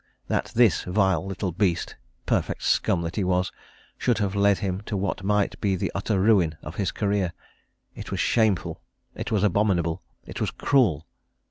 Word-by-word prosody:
that - - -1
this 115 -6 +4
vile 95 0 +2
little 95 -1 -3
beast, 90 -1 0 0.3
perfect - - -1
scum 85 - +2
that 85 +1 -5
he 100 - +1
was, 90 0 +1 0.5
should 120 -3 +1
have 100 -3 -1
led 100 -1 +3
him 95 -2 -3
to 105 -1 -4
what 95 0 -2
might 105 0 0
be 100 -2 +1
the 90 - -2
utter 100 0 -1
ruin 95 -6 +3
of 75 - -8
his 100 -3 0
career! 100 -4 0 0.6
it - - -8
was - - -3
shameful, 110 -6 +1 0.3
it - - -6
was 105 -3 +1
abominable, 95 -5 +1 0.2
it - - -7
was - - +1
cruel! 105 - +2
95 Hz, 170 wpm, -25 LUFS, 90-105 Hz, 0.6 s, this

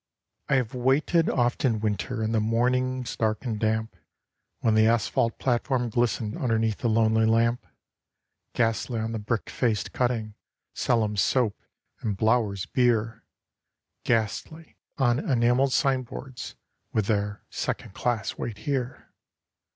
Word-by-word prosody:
I - - +4
have 125 -4 0
waited 135 +6 +2
oft 120 -1 +1
in 115 -5 +2
winter, 110 +3 -2
in 110 - 0
the 115 - +2
mornings 125 +3 0
dark 110 +2 -1
and 110 -4 -2
damp, 110 0 -1 0.7
When 110 - +3
the 110 0 +5
asphalt 115 0 +1
platform 125 -1 0
glistened 110 -2 0
underneath 115 -3 0
the 120 - 0
lonely 110 0 +3
lamp. 115 +2 +2 0.9
Ghastly 115 0 0
on 110 +1 -2
the 115 - -3
brick 110 +1 -2
faced 115 -5 -1
cutting 115 -4 -1 0.4
'Sellum's 105 -4 +1
Soap' 125 -6 +1 0.4
and 105 -3 -2
'Blower's 110 -3 +1
Beer;' 115 -3 +1 0.8
Ghastly 120 - -2 0.2
on 120 -3 +2
enamelled 125 0 +2
signboards 130 -1 -2 0.4
with 110 - +1
their 100 -1 -1
'Second - - -3
class 115 -3 -2
wait 115 -3 -4
here. 130 0 -3
115 Hz, 130 wpm, -26 LUFS, 110-125 Hz, 0.9 s, the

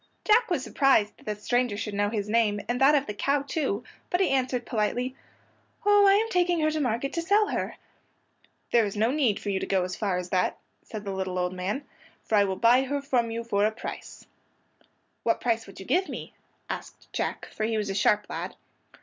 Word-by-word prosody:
Jack 450 +2 +4
was 330 -8 0
surprised 265 -7 +3
that - - -20
the 210 - -1
stranger 245 -1 0
should 210 0 -4
know 205 0 +1
his 210 -2 -2
name, 210 -2 +2
and 245 +2 -1
that 285 +3 +7
of 285 -1 +2
the 210 - -4
cow, 275 +6 0
too, 270 -7 -2 0.3
but 355 - +1
he 380 -7 +2
answered 255 -2 0
politely, 245 +4 -1 0.7
"Oh, 410 -1 +6
I 390 - +7
am 430 +3 +3
taking 355 -3 +2
her 310 0 +2
to 310 - -1
market 250 0 -1
to 335 - -1
sell 410 +5 +3
her." - - -2 1.0
"There 235 -1 +5
is 205 -1 -3
no 225 +3 +2
need 265 -8 +1
for 205 - -3
you 190 - 0
to - - -4
go 190 -2 +2
as 185 0 -4
far 195 -4 -1
as 180 0 -5
that," 180 -1 +1 0.2
said 215 -2 -8
the 195 - -3
little 190 -1 -3
old 180 0 0
man, 195 +10 -3 0.4
"for - - -7
I 205 -1 +5
will 190 -1 -1
buy 235 +5 +5
her 280 +2 -1
from 255 -4 0
you 230 +1 -3
for 205 -3 +1
a 215 - +4
price." 220 - -8 1.0
"What - - +1
price 230 -2 0
would 195 - -12
you 190 - -8
give 370 - +1
me?" - - -7 0.3
asked - - -8
Jack, - - -2
for 215 - -3
he 225 0 0
was 210 -2 -1
a - - -2
sharp 205 +1 +2
lad. - - -5
230 Hz, 225 wpm, -27 LUFS, 205-280 Hz, 1.0 s, that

